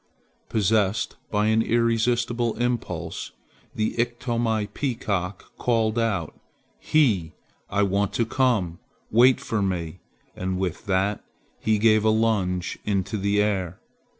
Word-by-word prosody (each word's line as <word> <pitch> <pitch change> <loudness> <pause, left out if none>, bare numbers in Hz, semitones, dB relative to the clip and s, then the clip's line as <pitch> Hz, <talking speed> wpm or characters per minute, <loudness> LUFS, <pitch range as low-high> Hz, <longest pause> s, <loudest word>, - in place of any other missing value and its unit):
Possessed 105 -1 +1
by 105 0 +1
an 110 0 +3
irrepressible 120 0 +1
impulse 120 0 -3 0.4
the 110 - 0
Iktomi 120 -2 0
peacock 100 -8 -3
called 115 -1 +1
out, 100 -9 -1 0.5
"He! 105 - +2 0.4
I 100 +1 +1
want 100 +1 +1
to 115 - +1
come! 110 -9 +1 0.3
Wait 125 +3 +6
for 110 -2 -2
me!" 90 -3 -2 0.4
and 95 0 -2
with 95 +2 -3
that 100 +2 0 0.4
he 110 -1 +2
gave 110 0 +4
a 110 - +4
lunge 105 -5 0
into 100 +1 -1
the 100 0 +2
air. 95 -4 -2
110 Hz, 120 wpm, -25 LUFS, 95-115 Hz, 0.5 s, Wait